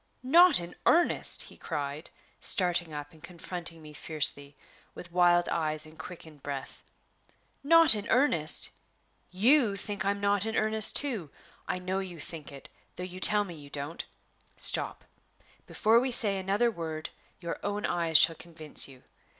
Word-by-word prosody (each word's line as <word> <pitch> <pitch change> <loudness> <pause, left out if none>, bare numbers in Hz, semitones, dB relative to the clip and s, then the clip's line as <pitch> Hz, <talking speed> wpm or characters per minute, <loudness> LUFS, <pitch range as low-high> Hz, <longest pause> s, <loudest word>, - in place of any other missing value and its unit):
"Not 340 +5 +6
in 170 0 -8
earnest!" 340 +1 +3
he - - -11
cried, 145 +2 -5 0.3
starting 175 -3 0
up 145 -1 -7
and 160 -1 -19
confronting 170 -1 -8
me 150 0 -12
fiercely, 145 -2 0 0.4
with 180 - -11
wild 175 0 +3
eyes 155 -2 -1
and 155 0 -15
quickened 160 -5 -11
breath. 140 -1 -7 0.8
"Not 330 0 +7
in 210 0 -2
earnest! 195 - +2 0.6
You 220 +4 +3
think 200 0 -5
I'm 200 +1 -1
not 200 +1 +1
in 220 - -3
earnest 215 0 +2
too. 230 - -1 0.4
I - - -2
know 185 +1 -3
you 180 -3 -7
think 155 -1 -8
it, 140 -1 -12 0.3
though 180 - -6
you 180 0 -8
tell 210 +2 +4
me 185 -4 -9
you 145 -3 -12
don't. 145 +3 -5 0.5
Stop; - - 0 0.6
before 225 +2 +3
we 260 +2 -1
say 205 -5 +2
another 200 +5 +1
word, 160 -4 -6 0.3
your 170 -1 -5
own 205 +1 -2
eyes 170 -2 +3
shall 165 - +7
convince 160 -3 -3
you. 130 -2 -16
175 Hz, 155 wpm, -29 LUFS, 155-205 Hz, 0.8 s, Not